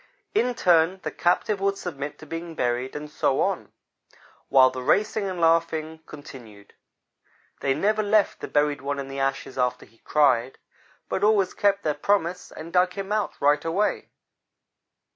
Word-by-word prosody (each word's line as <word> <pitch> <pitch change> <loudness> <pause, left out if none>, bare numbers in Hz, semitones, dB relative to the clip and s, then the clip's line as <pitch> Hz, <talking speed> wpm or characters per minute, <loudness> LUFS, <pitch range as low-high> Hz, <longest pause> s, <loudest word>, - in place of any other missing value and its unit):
In 250 - +1
turn 175 -1 +3
the - - -3
captive 195 +3 0
would 200 0 +1
submit 145 -6 -6
to - - -12
being 165 +2 -6
buried, 125 0 -1
and 150 0 -5
so 150 -3 0
on - - -1 0.8
while 130 -1 +6
the 130 0 -6
racing 205 +8 +1
and 185 -2 -5
laughing 165 -1 +1
continued. 115 -9 -12 0.9
They 135 -1 0
never 215 +7 +1
left 210 0 +2
the - - -6
buried 145 -1 +1
one 140 +1 -3
in 135 -1 -5
the 135 0 -5
ashes 135 -1 -2
after 125 0 0
he 115 +2 -26
cried, 130 -4 +2 0.5
but - - -2
always 205 -3 +3
kept 200 0 +1
their 150 - +1
promise 180 +2 -1
and 160 +2 -10
dug 180 0 +3
him 195 0 -6
out, 210 -1 -1
right 145 +1 +3
away. 185 +6 -1
160 Hz, 160 wpm, -25 LUFS, 135-195 Hz, 0.9 s, while